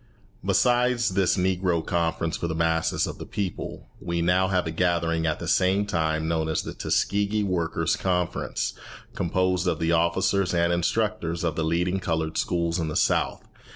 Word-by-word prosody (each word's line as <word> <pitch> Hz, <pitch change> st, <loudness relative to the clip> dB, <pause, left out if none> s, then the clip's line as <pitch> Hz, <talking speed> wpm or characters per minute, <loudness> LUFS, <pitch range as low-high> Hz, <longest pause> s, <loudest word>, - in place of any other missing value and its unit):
Besides 125 Hz, -2 st, +2 dB
this 95 Hz, +1 st, +1 dB
Negro 90 Hz, -2 st, +1 dB
Conference 85 Hz, -1 st, -1 dB
for 85 Hz, -, -3 dB
the 80 Hz, -, -3 dB
masses 80 Hz, 0 st, +1 dB
of -, -, -7 dB
the -, -, -6 dB
people, 100 Hz, -4 st, -4 dB
we 85 Hz, 0 st, -2 dB
now 90 Hz, +2 st, +3 dB
have 90 Hz, -2 st, +1 dB
a 80 Hz, -, -2 dB
gathering 85 Hz, -1 st, +1 dB
at 80 Hz, -, 0 dB
the -, -, -6 dB
same 95 Hz, +2 st, +2 dB
time 80 Hz, -4 st, -1 dB
known 80 Hz, -1 st, 0 dB
as 80 Hz, -, 0 dB
the -, -, -6 dB
Tuskegee 105 Hz, +1 st, 0 dB
Workers' 90 Hz, -4 st, 0 dB
Conference, 90 Hz, -2 st, -1 dB, 0.4 s
composed 90 Hz, +1 st, 0 dB
of -, -, +1 dB
the 80 Hz, 0 st, 0 dB
officers 90 Hz, +3 st, +2 dB
and 85 Hz, 0 st, +2 dB
instructors 85 Hz, -1 st, -1 dB
of 80 Hz, -3 st, 0 dB
the 80 Hz, -, -1 dB
leading 90 Hz, +4 st, 0 dB
coloured 80 Hz, -3 st, -2 dB
schools 85 Hz, 0 st, 0 dB
in 80 Hz, -, -1 dB
the 75 Hz, -, -4 dB
South. -, -, +1 dB
85 Hz, 170 wpm, -25 LUFS, 80-95 Hz, 0.4 s, now